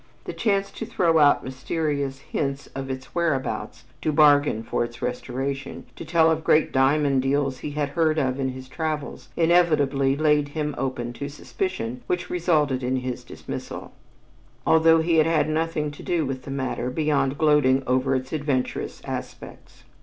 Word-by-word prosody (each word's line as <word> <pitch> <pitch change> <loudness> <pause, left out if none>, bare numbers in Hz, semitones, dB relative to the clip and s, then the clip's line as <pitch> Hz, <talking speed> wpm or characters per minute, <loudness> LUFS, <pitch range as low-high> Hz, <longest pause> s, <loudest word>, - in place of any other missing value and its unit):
The - - -6
chance 200 -3 0
to - - -6
throw 165 -3 +2
out 145 -1 +5
mysterious 140 +1 -2
hints 140 -1 -3
of 135 0 -5
its 130 0 -6
whereabouts, 130 -10 -2 0.2
to 155 - 0
bargain 145 -6 +4
for 115 - -1
its 120 0 -7
restoration, 135 +2 -4
to - - -8
tell 165 0 +3
of 160 0 -1
great 155 - +3
diamond 135 0 +3
deals 135 -1 0
he 145 - -5
had 145 -2 0
heard 160 +1 +1
of 130 -2 0
in 135 -1 0
his 130 0 -8
travels, 145 -3 -4
inevitably 150 -6 +3
laid 150 -1 +2
him 150 -1 -1
open 120 -3 -3
to 140 +3 -5
suspicion 140 -5 -4
which 180 0 -2
resulted 155 -7 +1
in 125 +1 0
his 130 -1 -3
dismissal, - - -7 0.7
although 160 0 +5
he 165 0 +2
had 155 0 +5
had 155 -2 +2
nothing 155 -1 -1
to 145 - -11
do 170 -3 0
with 130 -1 -5
the - - -7
matter 130 -2 -2
beyond 140 -1 0
gloating 145 -4 +3
over 130 +1 +1
its 130 +2 -4
adventurous 145 -4 -2
aspects. - - -8
145 Hz, 165 wpm, -24 LUFS, 130-155 Hz, 0.7 s, out